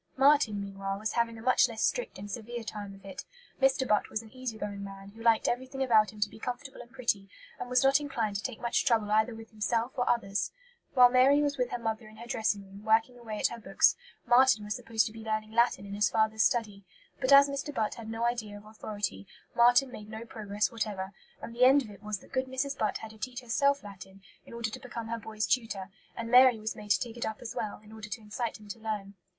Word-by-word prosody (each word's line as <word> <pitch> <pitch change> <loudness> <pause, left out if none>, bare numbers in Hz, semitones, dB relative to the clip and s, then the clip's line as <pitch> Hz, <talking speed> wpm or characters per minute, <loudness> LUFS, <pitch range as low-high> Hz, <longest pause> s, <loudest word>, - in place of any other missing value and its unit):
Marten, 270 -6 +4
meanwhile, 195 0 -4
was 215 +2 -2
having 230 -1 0
a 225 - -10
much 255 0 +4
less 225 -1 -3
strict - - 0
and 205 +2 -8
severe 235 +2 -5
time 205 -2 -7
of 195 0 -17
it. 190 -1 -7 0.4
Mr. 265 -1 +3
Butt 210 -1 +2
was 220 - -3
an 220 - -15
easy 255 -4 -5
going 200 -1 -5
man, 195 0 -9
who 220 +3 -14
liked 230 -1 +3
everything 260 +2 -1
about 220 -4 +4
him 215 - -14
to 205 - +2
be - - -13
comfortable 260 +3 -6
and 240 - -13
pretty, 235 -6 -1 0.3
and - - -5
was 250 +1 +3
not 270 +1 +5
inclined 230 -8 -2
to - - -4
take 250 0 -5
much 235 -1 +1
trouble 225 -5 +2
either 220 +2 +2
with 225 0 -11
himself 225 +3 -1
or 245 - 0
others. 200 -4 0 0.5
While 250 -1 +8
Mary 260 +3 +6
was 285 -2 -1
with 250 -1 +1
her - - -2
mother 225 -1 -3
in 215 - -14
her 235 - -9
dressing 215 -3 -1
room, 195 +1 -13
working 225 +3 +3
away 220 -3 -6
at - - +2
her 235 - -7
books, 220 - +3 0.3
Marten 245 -2 +5
was 210 - -2
supposed 230 -3 0
to 215 - -4
be 225 0 -9
learning 215 0 -2
Latin 235 -3 +2
in 200 - -7
his 210 +1 +2
father's 220 0 +1
study. 215 -4 +1 0.4
But 260 0 0
as 280 0 +9
Mr. 280 +1 -4
Butt 220 -6 -1
had 225 -1 -9
no 225 +1 -3
idea 225 -4 -2
of 205 - -14
authority, 205 - -5 0.3
Marten 245 +2 +5
made 210 -3 -9
no 220 +1 -7
progress 210 -1 -2
whatever, 205 -4 -3 0.3
and 230 - -6
the 245 - +3
end 275 +2 +6
of 215 - -10
it 200 -1 -14
was 210 -1 -3
that - - -18
good 260 0 0
Mrs. 265 +2 -2
Butt 215 -4 0
had 220 - -9
to 220 - -16
teach 250 +2 -5
herself 280 +4 +1
Latin, 195 -1 -12 0.2
in - - -11
order 230 -2 -2
to 255 - -7
become 235 -3 -7
her 230 0 -2
boy's 215 -1 -3
tutor; 210 -6 -1 0.3
and 230 0 -4
Mary 250 -1 +8
was 215 +1 -4
made 210 - -10
to 190 -3 +4
take 235 +2 -5
it 235 - -2
up 220 -1 -4
as 235 - -7
well, 210 - -3
in 215 - -15
order 220 -1 -9
to 210 +2 -5
incite 220 +2 -4
him 210 - -14
to 215 - -6
learn. 210 -3 -4
225 Hz, 250 wpm, -30 LUFS, 210-245 Hz, 0.5 s, as